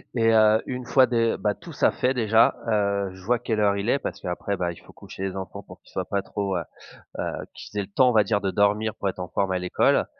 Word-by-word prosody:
et 115 -1 +3
heu, 110 0 +5
une 125 -1 -4
fois 130 +1 +5
dé 115 -2 +1
bah, 105 -1 0
tout 170 +4 -12
ça - - +3
fait 130 +1 0
déjà, 115 -2 +4
heu, 100 -2 +1
je 95 -1 -14
vois 120 +2 +2
quelle 110 -2 -2
heure 100 -1 +3
il 100 +3 -2
est. 140 - +2
Parce - - -5
qu'après 90 +3 -3 0.2
il - - -16
faut - - -17
coucher 95 - -9
les 95 - -6
enfants 95 -1 -6
pour - - -14
qu'ils - - -22
soient - - -3
pas 100 - -1
trop, 100 -1 -3
heu, 85 - -2 0.6
heu - - 0 0.3
qu'ils 105 - -7
aient - - 0
le 95 - -13
temps 125 +5 +4
on - - +1
va 110 -2 +5
dire 105 0 0
de 95 - -1
dormir 105 +2 +2
pour 100 - -2
être 95 - -7
en 90 -1 -5
forme 95 -1 -1
à 90 - 0
l'école. 90 0 +2
105 Hz, 270 wpm, -25 LUFS, 100-115 Hz, 0.6 s, heu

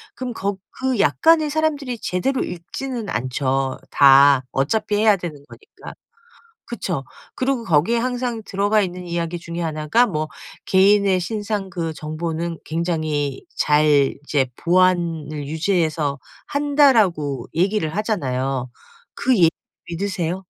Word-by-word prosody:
그럼 255 -1 -5
거 200 -2 -3 0.3
그 260 -2 +1
약관을 315 +7 +3
사람들이 290 -6 -1
제대로 255 +10 -1
읽지는 225 +7 -6
않죠 130 +2 -1
다 140 -1 +6
어차피 205 +10 0
해야 215 0 +5
되는 175 -4 -6
거니까. 420 - -13 0.7
그쵸. 175 - -4 0.3
그러고 255 -2 -1
거기에 175 +5 +2
항상 245 -1 -2
들어가 205 +2 +1
있는 180 -2 -4
이야기 170 0 -3
중에 170 0 -6
하나가 160 +9 +1
뭐 155 -6 -2 0.4
"개인의 195 0 +4
신상 205 +1 -3
그 170 -3 -4
정보는 165 +2 -4
굉장히 155 -4 -2
잘 150 -2 +3
이제 140 -3 +1
보안을 170 -5 +1
유지해서 155 -3 0 0.3
한다."라고 225 - +2
얘기를 180 -2 0
하잖아요. 135 - -2 0.4
그 255 -1 +1
얘기 165 -3 +5 0.4
믿으세요? 185 0 -3
175 Hz, 275 characters per minute, -21 LUFS, 155-215 Hz, 0.7 s, 다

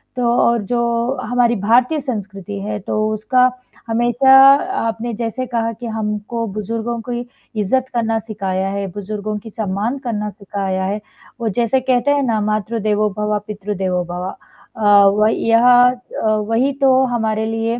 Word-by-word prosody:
तो 250 - -2 0.2
और 235 -1 +2
जो 235 +3 0
हमारी 245 -1 +2
भारतीय 240 +9 +2
संस्कृति 205 -5 -5
है, 210 +1 -4
तो 215 +2 -1
उसका 250 +4 +2 0.4
हमेशा 240 +3 +2 0.6
आपने 225 +1 -3
जैसे 235 +3 -3
कहा 230 -1 -1
कि 240 +2 -9
हमको 220 +1 -3
बुज़ुर्गों 230 +3 -3
की 240 0 -2 0.4
इज़्ज़त 255 +6 +1
करना 225 -1 0
सिखाया 195 -3 -3
है, 200 0 -3
बुज़ुर्गों 210 +2 -5
की 225 - -11
सम्मान 215 +4 -2
करना 210 -3 -2
सिखाया 195 -2 -4
है। 205 +2 -2 0.4
वो 225 - 0
जैसे 235 +4 +1
कहते 255 +1 +1
हैं 285 -1 +2
ना, 230 -4 0
"मातृ 215 +2 -1
देवो 210 0 +1
भव, 210 0 0
पितृ 210 0 -5
देवो 180 -1 -1
भव" 180 +1 -4 0.5
अ, 205 -2 +5
वही 215 +3 +2
यह 230 +1 +5 0.2
अ, 250 -2 -6 0.2
वही 255 +5 +1
तो 265 -1 +5
हमारे 220 -1 0
लिए 225 +1 -2
220 Hz, 155 wpm, -18 LUFS, 205-240 Hz, 0.6 s, अ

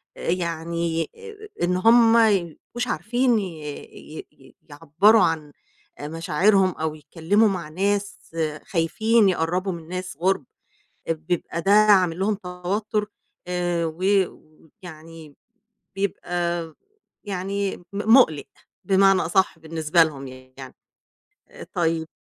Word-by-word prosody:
يعني 170 -1 -2
آآ 430 -2 -12
إن 180 +1 +1
هُم 230 +3 +5
ما 230 -1 +5
يبقوش 195 +6 -3
عارفين 235 +6 +1
ي 200 - -3 0.7
ي - - -9
ي - - -21
يعبّروا 165 +9 +3
عن 155 -3 -1 0.5
مشاعرهم 175 +5 +2
أو 160 -1 -4
يتكلموا 175 +8 +1
مع 175 -5 -4
ناس 200 +4 -1 0.5
خايفين 210 +5 +2
يقرّبوا 180 +2 -1
من 165 -3 -8
ناس 180 -3 -6
غُرب، 185 -2 0 0.7
بيبقى 165 +1 -3
ده 195 - 0
عامل 195 -5 +5
لهم 205 +3 +1
توتر، 200 +3 -3 0.4
آآ، 175 -1 -1
و 160 +3 -7 0.2
و 155 0 -20
ويعني 160 -3 -12 0.6
بيبقى 175 -4 -3 0.5
يعني 195 0 -3
م - - -18
مُقلق 210 - +4 0.4
بمعنى 195 0 +4
أصح 185 0 +1
بالنسبة 160 +1 +1
لهم 140 -4 -3
يعني، 130 0 -12 1.0
طيب 165 -2 0
180 Hz, 110 wpm, -23 LUFS, 160-200 Hz, 1.0 s, هُم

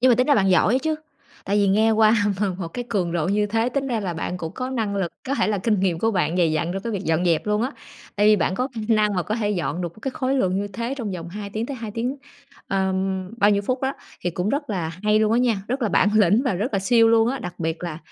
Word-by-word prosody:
Nhưng 255 - +5
mà 240 - +6
tính 255 +2 +2
ra 290 - +5
bạn 195 -2 +3
giỏi 185 +4 +4
ấy - - +3
chứ, 315 +2 -1 0.5
tại 200 - 0
vì 200 -1 +3
nghe 215 +3 +3
qua 220 0 +5 0.3
m - - +3
một 170 -3 -4
cái 245 +8 -5
cường 185 -7 -1
độ 170 0 0
như 210 +1 +2
thế, 225 +3 0
tính 275 +1 -2
ra 235 -4 -1
là 180 -4 -3
bạn 175 +2 -3
cũng 165 -2 -6
có 255 0 -4
năng 215 -5 -2
lực, 180 -4 -2 0.2
có 275 - +1
thể - - +1
là 205 -2 0
kinh 210 0 +1
nghiệm 180 -4 +1
của 225 +4 +1
bạn 175 -3 0
dày 165 -3 +3
dặn 165 +3 -1
trong 195 0 -4
cái 230 - -3
việc 195 -1 -3
dọn 165 +2 +1
dẹp 170 +2 +1
luôn 210 +1 +1
á. 260 - -1 0.5
Tại 205 +1 +3
vì 215 0 +6
bạn 185 +1 0
có 255 +6 -1
kh 230 -3 -6
năng 210 -2 +3
mà 180 - 0
có 215 - -2
thể 210 -3 -1
dọn 175 -3 -2
được 170 -1 -4
một - - -17
cái 270 - -2
khối 260 +1 -1
lượng 190 -8 +1
như 205 +1 -2
thế 235 +6 -4
trong 230 -7 -4
vòng 170 -1 -6
2 200 +2 -7
tiếng 220 +3 -3
tới 275 - -5
2 225 -3 -6
tiếng, 245 +6 -3 0.5
ờm, 190 -1 -1
bao 205 -2 +4
nhiêu 200 0 +2
phút 255 +5 -2
đó, 265 +1 0 0.3
thì 175 - -1
cũng 180 +4 -2
rất 285 -1 -2
là 175 -5 -2
hay 210 0 +3
luôn 215 0 +2
á 235 - +3
nha, 230 -6 +1
rất 255 +1 -2
là 220 - +2
bản 200 - +3
lĩnh 210 +3 +4
và 255 - +1
rất 215 +8 -2
là 195 - +1
siêu 230 +3 +4
luôn 225 0 +4
á, 270 +2 -2
đặc 180 -6 -6
biệt 165 +1 -3
là 165 -3 -4
210 Hz, 310 wpm, -23 LUFS, 185-235 Hz, 0.5 s, mà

